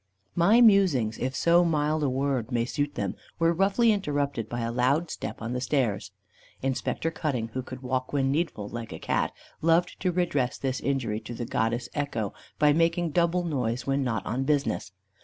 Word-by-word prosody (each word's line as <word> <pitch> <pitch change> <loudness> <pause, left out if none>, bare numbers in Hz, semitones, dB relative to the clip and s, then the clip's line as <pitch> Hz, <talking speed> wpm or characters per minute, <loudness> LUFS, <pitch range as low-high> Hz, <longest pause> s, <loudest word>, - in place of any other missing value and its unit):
My 205 +8 +5
musings, 185 - +4
if 130 +1 -2
so 170 +1 +4
mild 155 -2 +1
a 145 - +2
word 130 -2 -1
may 120 -1 +1
suit 145 +3 -2
them, - - -2 0.2
were 165 0 +3
roughly 195 +6 +3
interrupted 145 - -1
by 120 0 -3
a 115 0 -1
loud 140 +7 +1
step - - -6
on 115 +2 -3
the 125 - -2
stairs. 130 -6 0 0.5
Inspector 135 +4 -1
Cutting, 130 -9 -2
who 130 +3 -3
could 130 +1 -9
walk 130 0 -2
when 135 -2 +1
needful 145 -9 -1
like 115 0 -6
a - - -6
cat, - - 0 0.3
loved 165 +2 +2
to 185 - +1
redress 165 -8 0
this 130 -1 -2
injury 125 -6 -1
to 120 - -8
the 120 - -4
Goddess 120 +2 -1
Echo, 120 -9 -2 0.2
by 150 0 +5
making 165 +1 +2
double 170 +2 +2
noise 125 -7 -1
when 135 0 +1
not 115 -5 -2
on 125 +4 -1
business. 140 -8 0
135 Hz, 185 wpm, -27 LUFS, 120-165 Hz, 0.5 s, My